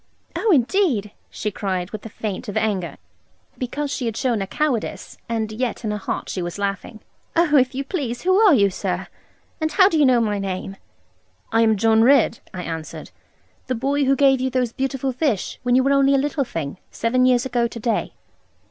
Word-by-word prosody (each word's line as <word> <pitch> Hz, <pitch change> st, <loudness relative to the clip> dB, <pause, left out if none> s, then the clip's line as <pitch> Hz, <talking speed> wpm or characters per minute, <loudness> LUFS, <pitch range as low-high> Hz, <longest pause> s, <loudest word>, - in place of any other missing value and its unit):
'Oh, 445 Hz, -, +1 dB
indeed,' 265 Hz, -, +2 dB, 0.2 s
she 210 Hz, -, -4 dB
cried, 190 Hz, -2 st, -3 dB
with 215 Hz, -, -7 dB
a -, -, -11 dB
feint 205 Hz, -1 st, -5 dB
of 205 Hz, -, -3 dB
anger 190 Hz, -8 st, -1 dB, 0.6 s
(because 280 Hz, +3 st, -3 dB
she 250 Hz, -, -2 dB
had 225 Hz, -1 st, -3 dB
shown 245 Hz, -5 st, 0 dB
her 195 Hz, -, -3 dB
cowardice, 280 Hz, -2 st, -2 dB
and 220 Hz, -2 st, -2 dB
yet 245 Hz, +2 st, -3 dB
in 215 Hz, -, -1 dB
her 210 Hz, -, -3 dB
heart -, -, -4 dB
she 185 Hz, -, -3 dB
was 175 Hz, +1 st, -5 dB
laughing); 200 Hz, +2 st, -4 dB, 0.3 s
'oh, 330 Hz, -3 st, +3 dB
if 255 Hz, -1 st, +3 dB
you 275 Hz, -, -2 dB
please, 275 Hz, -7 st, -4 dB
who 370 Hz, +1 st, +3 dB
are 415 Hz, -8 st, +6 dB
you, 200 Hz, -4 st, +3 dB
sir, -, -, -3 dB, 0.5 s
and 315 Hz, -1 st, -1 dB
how 380 Hz, -2 st, +6 dB
do 325 Hz, -6 st, +1 dB
you 295 Hz, -, +5 dB
know 250 Hz, -2 st, +4 dB
my 210 Hz, -3 st, 0 dB
name?' 195 Hz, 0 st, -4 dB, 0.8 s
'I 225 Hz, -, +4 dB
am 220 Hz, -2 st, +3 dB
John 225 Hz, +1 st, +4 dB
Ridd,' 245 Hz, -2 st, +4 dB
I 180 Hz, -1 st, -6 dB
answered; 160 Hz, -2 st, -6 dB, 0.6 s
'the 255 Hz, -, -1 dB
boy 280 Hz, +4 st, 0 dB
who 270 Hz, +1 st, +3 dB
gave 270 Hz, -1 st, +4 dB
you 260 Hz, -, 0 dB
those 250 Hz, -2 st, -1 dB
beautiful 270 Hz, 0 st, -2 dB
fish, 255 Hz, -, -1 dB
when 245 Hz, -1 st, +2 dB
you 260 Hz, -, +4 dB
were 275 Hz, +1 st, +3 dB
only 275 Hz, 0 st, +4 dB
a -, -, +4 dB
little 280 Hz, 0 st, 0 dB
thing, 165 Hz, -4 st, -5 dB
seven 255 Hz, +3 st, +1 dB
years 245 Hz, -1 st, +3 dB
ago 240 Hz, -2 st, +1 dB
to 230 Hz, -, -9 dB
day.' 230 Hz, +1 st, -1 dB
245 Hz, 205 wpm, -22 LUFS, 210-275 Hz, 0.8 s, are